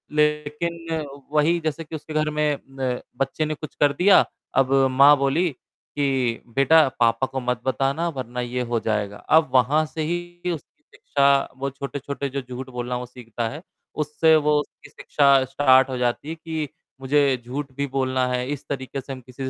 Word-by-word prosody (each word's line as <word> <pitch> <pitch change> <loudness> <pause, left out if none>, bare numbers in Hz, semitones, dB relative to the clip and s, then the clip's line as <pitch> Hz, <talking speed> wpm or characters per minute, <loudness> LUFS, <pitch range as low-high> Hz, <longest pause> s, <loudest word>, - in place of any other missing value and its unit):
लेक़िन 150 +2 -1 0.3
वही 155 +3 +3
जैसे 160 0 -3
कि 160 +1 -8
उसके 155 +1 -8
घर 155 0 +1
में 150 -1 0 0.2
न 125 -2 -1 0.2
बच्चे 135 +3 -1
ने 155 - -2
कुछ 155 - -9
कर 145 -1 +4
दिया। 190 +6 +5 0.3
अब 135 0 +3 0.2
माँ 140 +3 +7
बोली 145 +6 +1 0.5
कि 130 -5 0
बेटा 155 +2 +5
पापा 115 +2 +3
को 135 0 -4
मत 125 -1 -2
बताना 135 +5 0
वरना 125 -4 -5
ये 125 +1 -3
हो 115 - +2
जाएगा। 105 -2 -2
अब 155 -4 +3
वहाँ 140 +5 +3
से 155 +1 -6
ही 175 +2 -3
उसकी 160 -5 -9
शिक्षा 140 -1 +1 0.3
वो 135 +1 -2
छोटे-छोटे 140 +1 -5
जो 140 +1 -3
झूठ 130 +1 -8
बोलना 125 0 -3
वो 125 - -5
सीखता 120 -2 -5
है, 150 +6 -8 0.3
उससे 155 +1 +3
वो 150 -1 +3
उसकी 150 - -14
शिक्षा 140 -2 +3
स्टार्ट 130 0 +4
हो 130 - -3
जाती 125 +4 -1
है 165 - -4
कि 160 -2 -4 0.3
मुझे 140 -1 +2
झूठ 135 +2 -5
भी 140 0 -1
बोलना 130 -1 0
है, 125 0 -1
इस 145 -1 -5
तरीक़े 135 0 -4
से 135 +1 -7
हम 130 - -9
किसी 130 +2 -8
140 Hz, 180 wpm, -23 LUFS, 130-155 Hz, 0.5 s, माँ